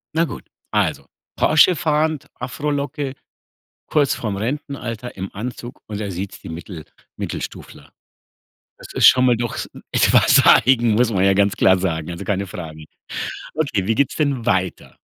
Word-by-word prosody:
Na 165 +1 +3
gut, - - -8 0.3
also, - - 0 0.3
Porsche 160 +4 +5
fahrend, 155 -1 0
Afrolocke, 140 +1 -3 0.7
kurz 145 -3 +2
vorm 105 -4 -3
Rentenalter, 125 0 -5
im 95 0 -5
Anzug 120 +3 -7
und 105 -1 -6
er 100 -2 -3
siezt 95 +2 -6
die - - -9
Mittel 80 0 -8 0.3
Mittelstufler. 70 - -7 0.9
Das - - -12
ist - - +5
schon 130 0 +5
mal 125 -1 +4
doch 120 0 -3
s - - -4 0.2
etwas - - +5
eigen, 120 -2 +5
muss 120 +1 +3
man 95 -1 +2
ja 95 - +4
ganz 100 0 +2
klar 95 0 +4
sagen, 80 -3 -2
also, 85 - -6
keine 100 -1 -1
Frage. 80 -4 -8 0.7
Okay, 135 -12 -1
wie 115 - +2
geht's 140 +2 +1
denn 140 -6 -1
weiter? 95 -5 -1
115 Hz, 155 wpm, -20 LUFS, 95-140 Hz, 0.9 s, Porsche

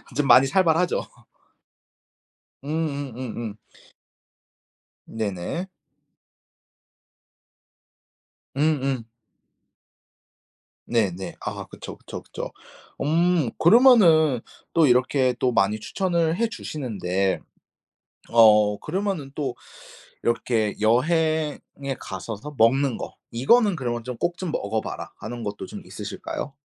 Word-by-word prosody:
좀 145 -1 +1
많이 135 +1 +7
살벌하죠. 175 +2 +2 1.6
음음음음. 135 -8 -4 1.5
네네. 110 - -3 2.9
음음. 135 -4 0 1.8
네네 95 -6 -1
아 - - -5
그쵸, - - -9
그쵸, - - -8
그쵸. - - -7 0.5
음 165 -3 +2
그러면은 170 - +6 0.3
또 165 -3 +5
이렇게 130 +1 +3
또 125 - +2
많이 105 -1 +2
추천을 170 - 0
해 230 +2 +2
주시는데 100 - -2 0.9
어 105 -3 +6
그러면은 180 -5 -3
또 135 -5 -3 0.7
이렇게 115 -3 0
여행에 150 +3 0
가셔서 110 +9 -7
먹는 130 +3 +3
거 - - -7 0.2
이거는 200 - +4
그러면 120 -5 -3
좀 125 -1 -4
꼭 175 +5 -1
좀 185 -4 -4
먹어봐라 110 -7 -3
하는 120 +1 -7
것도 105 -1 -5
좀 - - -8
있으실까요? 135 - -6
135 Hz, 190 characters per minute, -24 LUFS, 115-160 Hz, 2.9 s, 많이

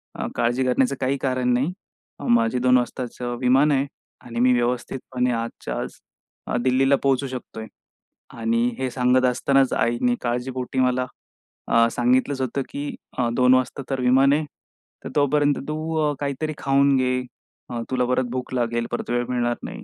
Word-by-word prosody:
"अ, - - -3
काळजी 120 +2 +1
करण्याचं 130 +2 +2
काही 135 +1 +1
कारण 130 -2 +1
नाही. 130 +7 +1 0.6
माझी 120 +1 +3
2 125 0 +4
वाजताचं 120 0 -3
विमान 135 +4 +4
आहे 140 0 +1 0.3
आणि 115 -1 -6
मी 125 0 +5
व्यवस्थितपणे 125 +1 -1
आजच्या 115 - -4
आज - - -7 0.5
अ, - - 0
दिल्लीला 135 +2 +3
पोहोचू 135 0 +2
शकतोय." 120 -4 -7 0.7
आणि 115 +1 +1
हे 130 - -1
सांगत 125 0 +3
असतानाच 135 +2 +2
आईनी 120 +1 +1
काळजीपोटी 125 +2 -2
मला, 125 0 +2 0.6
अ, 115 0 +4
सांगितलंच 130 +3 +1
होतं, 130 +2 -1
की 145 +1 -5 0.2
"अ, 120 -2 +1
2 125 +1 +4
वाजता 130 +2 -1
तर 135 - -1
विमान 130 +2 +4
आहे. 155 +1 +1 0.6
तर - - -5
तोपर्यंत 145 0 +3
तू 155 +1 -3 0.2
अ, - - -3
काहीतरी 145 +2 -2
खाऊन 140 0 +3
घे. 125 0 +1 0.5
अ, 120 -2 -3
तुला 125 -1 +1
परत 125 +1 +1
भूक 130 0 -4
लागेल, 120 -1 0
परत - - -4
वेळ 120 0 0
मिळणार 120 -1 0
नाही." - - -7
125 Hz, 160 wpm, -23 LUFS, 120-135 Hz, 0.7 s, मी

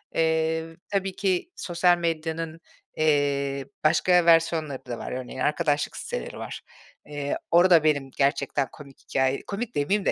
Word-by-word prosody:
Eee, 160 0 +1 0.3
tabii 195 -2 -1
ki 190 - 0
sosyal 175 0 +2
medyanın, 165 -1 -3 0.4
eee, 140 -3 +1 0.2
başka 170 +3 +4
versiyonları 165 -5 +2
da 120 -2 -5
var. - - -6
Örneğin; 130 0 -6
arkadaşlık 150 0 0
siteleri - - -5
var, - - -7 0.4
eee, 145 -1 -3
orada 170 -2 +6
benim 145 -3 +1
gerçekten 140 0 +1
komik 140 -3 -14
hikâye 130 0 +1
komik 225 +3 -4
demeyeyim 195 +8 +1
de - - +3
155 Hz, 135 wpm, -25 LUFS, 140-170 Hz, 0.4 s, orada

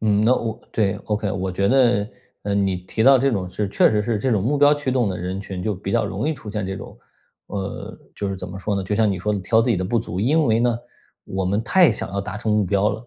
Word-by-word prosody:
嗯， 105 -1 +2
那 125 +3 +5
我 115 -2 -3
对 100 -4 +1
，ok， 105 -2 -1
我 95 0 -2
觉 100 +2 +1
得， 120 -5 +3 0.3
呃， 100 -1 -1
你 95 -2 +1
提 95 +5 -3
到 135 +2 +7
这 135 +2 +2
种 95 -5 -2
是 100 +2 -3
确 - - +4
实 105 -1 +1
是 110 -1 -1
这 130 +4 0
种 100 -3 +1
目 140 +5 +1
标 145 +1 +6
驱 145 -3 -3
动 125 -5 +1
的 95 - -3
人 90 +2 -4
群 95 -2 -6
就 105 -2 -1
比 95 +1 -5
较 - - +2
容 100 +9 -2
易 160 - 0
出 110 - -9
现 105 -2 -3
这 95 0 -4
种， - - -10 0.5
呃， 95 -1 -5 0.2
就 100 - -3
是 95 - -3
怎 90 - -7
么 95 +1 -7
说 100 +2 -2
呢？ 100 - -1
就 100 +3 -2
像 110 -2 +3
你 95 - -2
说 105 +4 -1
的 105 - -1
挑 110 +4 +2
自 120 - 0
己 105 - +2
的 90 - -2
不 115 +5 +1
足。 95 -5 -4
因 150 +9 +2
为 110 0 +3
呢， 120 -1 +2 0.5
我 95 0 -3
们 100 +4 0
太 180 +5 +5
想 - - -4
要 100 0 -2
达 105 +1 -6
成 110 0 -1
目 105 -1 +2
标 100 +3 +2
了， 110 +4 -7
105 Hz, 310 characters per minute, -22 LUFS, 95-115 Hz, 0.5 s, 到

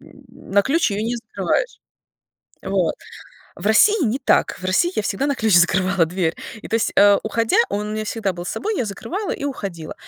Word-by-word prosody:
на 200 0 -3
ключ 310 +1 +1
ее 205 +1 -2
не 235 +2 -1
закрываешь. 220 - -2 0.8
Вот. - - 0 0.6
В - - -7
России 360 - +4
не 240 +5 -1
так. - - +1
В 185 - -12
России 185 - +2
я - - +1
всегда 205 +6 -1
на 285 - 0
ключ 220 -4 0
закрывала 180 0 +3
дверь, 170 -1 -1 0.3
и - - -7
то - - -3
есть, 225 - -1
э, 200 0 +6
уходя 225 +1 0
он 205 +1 -3
у - - -5
меня 215 0 -3
всегда 215 -2 -2
был 175 0 -7
собой, 430 - -3
я 250 - 0
закрывала 340 - -5
и - - -5
уходила, 195 - -5
210 Hz, 195 wpm, -21 LUFS, 190-255 Hz, 0.8 s, э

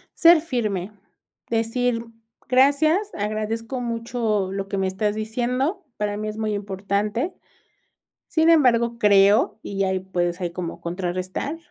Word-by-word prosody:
Ser 335 -1 +7
firme, 215 - -2 0.6
decir: 230 +1 0 0.4
"Gracias, 285 - +3
agradezco 215 +4 -3
mucho 230 -4 -1
lo 195 0 -3
que 195 - -3
me 190 0 +1
estás 205 +2 -1
diciendo". 250 - -1
Para 205 -1 -2
mí 215 0 -4
es 215 0 -5
muy 215 -1 -1
importante. 205 - -2 0.9
Sin 320 0 +3
embargo, 235 -7 +4
creo 210 - +4
y 195 0 -2
ahí 190 -1 0
puedes 180 -1 -2
ahí 175 -1 -2
como 170 -1 -6
contrarrestar: 185 - -3
215 Hz, 130 wpm, -23 LUFS, 195-250 Hz, 0.9 s, Ser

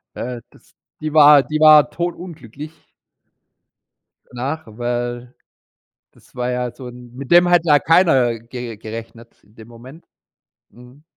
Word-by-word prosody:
Äh, 125 -1 -6
das - - -25 0.3
die 155 0 -5
war 145 -2 +6
die 155 0 -4
war 155 -1 +6
todunglücklich 165 -5 -7 1.5
danach, 140 +6 -6
weil, 120 +2 -5 0.8
das - - -26
war 125 0 -3
ja 125 -1 -3
so 125 0 -10
'n 125 0 -14
mit 135 +1 -10
dem 175 +1 +5
hat 175 -1 +3
ja 150 -3 +4
keiner 135 -9 +2
ge 120 0 -9
gerechnet 115 +2 -11
in 105 - -28
dem 110 -1 -15
Moment. 125 +7 -15 0.7
Mhm. 125 +5 -19
125 Hz, 135 wpm, -18 LUFS, 120-155 Hz, 1.5 s, war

